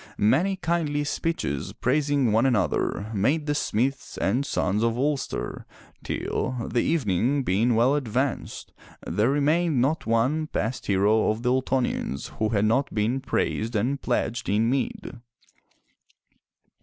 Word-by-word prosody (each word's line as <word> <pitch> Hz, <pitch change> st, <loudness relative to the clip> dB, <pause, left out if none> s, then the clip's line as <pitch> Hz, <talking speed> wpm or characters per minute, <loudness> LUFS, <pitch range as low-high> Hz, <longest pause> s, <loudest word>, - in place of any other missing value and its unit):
Many 160 Hz, -, +2 dB
kindly 165 Hz, -5 st, -1 dB
speeches 145 Hz, -, -2 dB
praising 140 Hz, -2 st, +1 dB
one 115 Hz, +5 st, +3 dB
another 110 Hz, -3 st, 0 dB
made 140 Hz, +10 st, +1 dB
the 145 Hz, -, 0 dB
smiths 130 Hz, -2 st, -1 dB
and 120 Hz, +8 st, +1 dB
sons 105 Hz, -6 st, 0 dB
of 115 Hz, 0 st, +1 dB
Ulster, 140 Hz, +1 st, -2 dB, 0.4 s
till, 130 Hz, -, -2 dB
the 120 Hz, -, +1 dB
evening 135 Hz, -, +1 dB
being 115 Hz, +4 st, +2 dB
well 120 Hz, +5 st, +4 dB
advanced, 130 Hz, -1 st, -2 dB, 0.3 s
there 105 Hz, +8 st, +1 dB
remained 150 Hz, +1 st, +2 dB
not 140 Hz, +4 st, 0 dB
one 130 Hz, +8 st, +1 dB
past 120 Hz, -2 st, -3 dB
hero 105 Hz, +3 st, +3 dB
of 110 Hz, +2 st, -2 dB
the 125 Hz, -, +2 dB
Ultonians 130 Hz, -, -1 dB
who 110 Hz, -, +1 dB
had 105 Hz, -1 st, +1 dB
not 120 Hz, +6 st, +1 dB
been 110 Hz, +5 st, 0 dB
praised 115 Hz, -3 st, -1 dB
and 130 Hz, +7 st, 0 dB
pledged 120 Hz, -1 st, -1 dB
in 110 Hz, +4 st, +2 dB
mead. 130 Hz, -1 st, -3 dB
125 Hz, 130 wpm, -25 LUFS, 110-145 Hz, 0.4 s, well